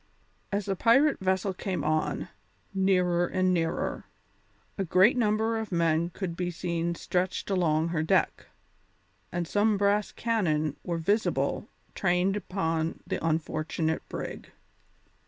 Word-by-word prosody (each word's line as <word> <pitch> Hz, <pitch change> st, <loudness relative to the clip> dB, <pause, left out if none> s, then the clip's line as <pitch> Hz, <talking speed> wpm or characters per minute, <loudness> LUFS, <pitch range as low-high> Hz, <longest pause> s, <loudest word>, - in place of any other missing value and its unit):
As 200 Hz, -1 st, -1 dB
the 195 Hz, -, -1 dB
pirate 270 Hz, -, +4 dB
vessel 190 Hz, +1 st, 0 dB
came 185 Hz, 0 st, -3 dB
on, 155 Hz, 0 st, -1 dB, 0.4 s
nearer 180 Hz, -2 st, +2 dB
and 185 Hz, 0 st, +1 dB
nearer, 165 Hz, -1 st, -1 dB, 0.7 s
a 195 Hz, -, -1 dB
great 185 Hz, +7 st, +5 dB
number 220 Hz, -1 st, +1 dB
of 220 Hz, -2 st, -5 dB
men 170 Hz, -1 st, +2 dB
could 175 Hz, -1 st, -5 dB
be 180 Hz, 0 st, -2 dB
seen 170 Hz, 0 st, -2 dB
stretched 180 Hz, +3 st, -2 dB
along 165 Hz, -3 st, +2 dB
her 165 Hz, -2 st, 0 dB
deck, 160 Hz, -, +1 dB, 0.8 s
and 175 Hz, -1 st, -2 dB
some 210 Hz, +2 st, +2 dB
brass 205 Hz, +1 st, +2 dB
cannon 155 Hz, -, 0 dB
were 170 Hz, -2 st, -2 dB
visible 200 Hz, +7 st, 0 dB, 0.3 s
trained 185 Hz, +1 st, +1 dB
upon 165 Hz, -5 st, -2 dB
the -, -, -3 dB
unfortunate 160 Hz, 0 st, -1 dB
brig. -, -, -6 dB
180 Hz, 125 wpm, -28 LUFS, 165-200 Hz, 0.8 s, great